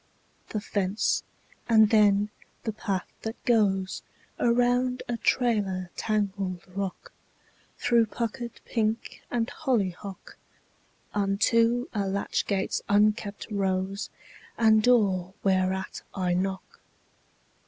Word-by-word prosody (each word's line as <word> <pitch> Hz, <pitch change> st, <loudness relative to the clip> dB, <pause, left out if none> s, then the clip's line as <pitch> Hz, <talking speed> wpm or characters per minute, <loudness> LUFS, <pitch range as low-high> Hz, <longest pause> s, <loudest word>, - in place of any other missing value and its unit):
The 215 Hz, -, -2 dB
fence; 200 Hz, 0 st, 0 dB, 0.5 s
and 220 Hz, -2 st, +6 dB
then 210 Hz, -1 st, +4 dB, 0.3 s
the 220 Hz, -, -2 dB
path 195 Hz, -3 st, -3 dB
that 220 Hz, +1 st, -4 dB
goes 195 Hz, -5 st, +2 dB, 0.4 s
Around 245 Hz, +1 st, +2 dB
a 240 Hz, -, -1 dB
trailer 205 Hz, -7 st, +1 dB
tangled 200 Hz, -4 st, -1 dB
rock, 195 Hz, -2 st, -4 dB, 0.7 s
Through 235 Hz, -2 st, +3 dB
puckered 235 Hz, +1 st, -4 dB
pink 225 Hz, -1 st, -2 dB
and 235 Hz, -2 st, 0 dB
hollyhock, 200 Hz, -, -3 dB, 0.8 s
Unto 230 Hz, +4 st, +2 dB
a 200 Hz, -2 st, -1 dB
latch 195 Hz, +1 st, -1 dB
gate's 195 Hz, -2 st, 0 dB
unkempt 205 Hz, 0 st, +2 dB
rose, 195 Hz, 0 st, -1 dB, 0.5 s
And 220 Hz, -1 st, +5 dB
door 195 Hz, -6 st, +3 dB
whereat 190 Hz, -1 st, 0 dB
I 180 Hz, -2 st, 0 dB
knock. 190 Hz, +1 st, -3 dB
205 Hz, 100 wpm, -27 LUFS, 190-230 Hz, 0.8 s, and